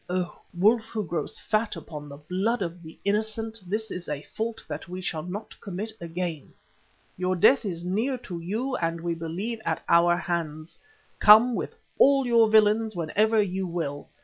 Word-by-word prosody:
Oh! 180 -1 -2
wolf 215 +6 +3
who 220 -2 -4
grows 160 -2 -3
fat 215 0 -1
upon 150 -2 -8
the 140 - -9
blood 190 +9 -1
of 170 0 -6
the 160 -1 -12
innocent, 220 +2 -1
this 215 +3 -2
is 180 -3 -6
a 150 -1 -3
fault 225 0 -4
that - - -6
we 180 +1 -5
shall 165 -4 -2
not 185 +6 -6
commit 200 +3 -4
again. 170 -2 -5 0.6
Your 185 0 0
death 245 +8 +5
is 175 -3 -4
near 225 +9 0
to 180 -8 -7
you 225 +10 -2
and 165 0 -1
we 170 0 -2
believe 175 +8 -3
at 165 -4 -2
our 175 +1 +5
hands. 165 -2 -4 0.4
Come 220 +4 +8
with - - -4 0.2
all 275 -1 +6
your 230 -2 +5
villains 215 0 +4
whenever 210 +7 +2
you 190 -1 -3
will. 160 -5 -4
185 Hz, 175 wpm, -26 LUFS, 170-220 Hz, 0.6 s, Come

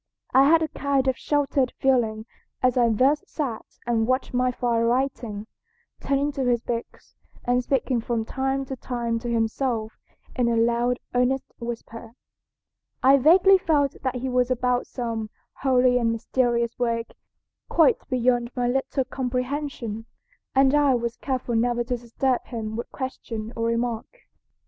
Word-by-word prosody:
I 270 +2 +6
had 325 0 +5
a - - 0
kind 275 -2 0
of 260 - +2
sheltered 280 -2 0
feeling 225 -5 +1 0.4
as 255 -1 +3
I 240 -2 +4
thus 265 +7 +3
sat 260 -8 -3 0.2
and 230 -2 +1
watched 255 +1 0
my 250 0 +2
father 235 -2 0
writing, 235 -4 -1 0.5
turning 280 +1 0
to 275 -2 -3
his 245 -1 +2
books, 235 -1 -6 0.3
and 245 0 +2
speaking 255 -2 0
from 225 -1 -2
time 270 +2 -1
to 265 - -5
time 235 -2 -3
to 240 +1 -5
himself 225 0 -1 0.4
in 245 -2 +2
a 235 - +1
loud, 235 +2 +2 0.2
earnest 250 +2 0
whisper. 230 -1 -7 0.9
I 270 +2 +7
vaguely 370 +7 +6
felt 290 -5 +1
that 260 -1 -2
he 250 +1 -3
was 250 -1 +1
about 250 0 0
some 230 -3 -4 0.3
holy 255 -2 +4
and 230 -1 +1
mysterious 235 0 0
work 230 -1 -1 0.6
quite 320 -4 +4
beyond 245 -1 +1
my 245 -1 0
little 270 +1 0
comprehension, 250 -3 -3 0.5
and 270 0 +5
I 290 -3 +4
was 235 -1 -2
careful 255 -3 -3
never 240 +1 +1
to 245 +1 -2
disturb 245 +2 -1
him 220 -2 -5
by 235 - -2
question 230 -4 -5
or 230 - -1
remark. 230 -1 -1
245 Hz, 150 wpm, -25 LUFS, 235-265 Hz, 0.9 s, I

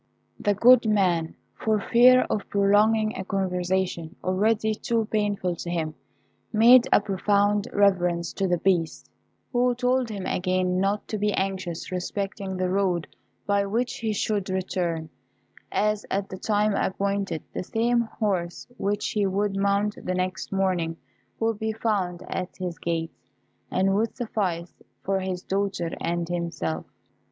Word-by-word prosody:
The 205 -1 +1
good 240 +2 +6
man, 180 -6 +1 0.2
for 215 -1 0
fear 250 +4 +6
of 210 - -3
prolonging 215 +2 +3
a 190 - -4
conversation 185 -2 -1
already 215 +4 +1
too 225 +1 -1
painful 205 -4 0
to 170 - -5
him, 160 -3 -2 0.6
made 240 +3 +7
a - - +7
profound 205 +1 +1
reverence 180 -4 +2
to 195 - 0
the 175 -1 +2
Beast, 170 -3 0 0.4
who 245 0 +2
told 250 0 +1
him 200 -3 -5
again 185 0 0
not 200 +2 0
to 215 - -2
be 210 0 +1
anxious 190 -3 -3
respecting 190 +1 -3
the 185 0 0
road 185 -4 0 0.4
by 200 0 +2
which 245 +5 -1
he 225 -2 -1
should 205 -1 -1
return; 175 -4 -2 0.6
as 210 0 +1
at 195 0 -1
the 190 - -6
time 210 0 +1
appointed 195 -3 -1
the - - -3
same 235 +4 +1
horse 200 -6 -2
which 205 -1 -1
he 205 -2 +1
would 195 +1 0
mount 200 +1 0
the 185 - -2
next 185 +1 -3
morning 180 -4 0 0.4
would 225 -2 0
be 220 0 -1
found 200 -6 -1
at 185 0 -4
his 180 -4 -5
gate, 165 -1 -2 0.6
and 190 +1 +2
would 220 +3 0
suffice 190 -8 -2 0.3
for 195 0 0
his 185 -1 -4
daughter 195 -4 -1
and 170 0 -1
himself. 170 - -3
195 Hz, 145 wpm, -25 LUFS, 180-215 Hz, 0.6 s, made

